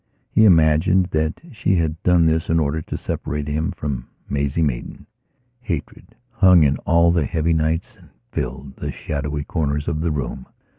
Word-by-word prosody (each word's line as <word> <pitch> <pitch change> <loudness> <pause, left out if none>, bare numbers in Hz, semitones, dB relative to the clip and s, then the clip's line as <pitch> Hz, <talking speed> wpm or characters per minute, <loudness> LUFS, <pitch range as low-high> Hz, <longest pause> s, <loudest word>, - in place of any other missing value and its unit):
He 110 - +5
imagined 85 +1 +4
that 80 +1 -1
she 105 -5 0
had 80 -1 -1
done 90 -2 +4
this 80 0 +1
in 80 0 +3
order 80 +1 0
to - - -5
separate 75 +1 -4
him 75 +2 -1
from 70 -4 -4 0.2
Maisie 70 +3 0
Maidan. 65 -6 -3 0.5
Hatred 110 - -6 0.2
hung 90 -4 +6
in 70 -1 +2
all 85 +1 +5
the 85 -4 +1
heavy 85 -1 0
nights 80 +9 -1
and 85 -5 -20 0.2
filled 65 -1 -5
the - - -4
shadowy 75 0 -4
corners 75 -2 -2
of 80 -2 -1
the 85 - 0
room. 65 -4 -4
80 Hz, 165 wpm, -21 LUFS, 75-85 Hz, 0.5 s, hung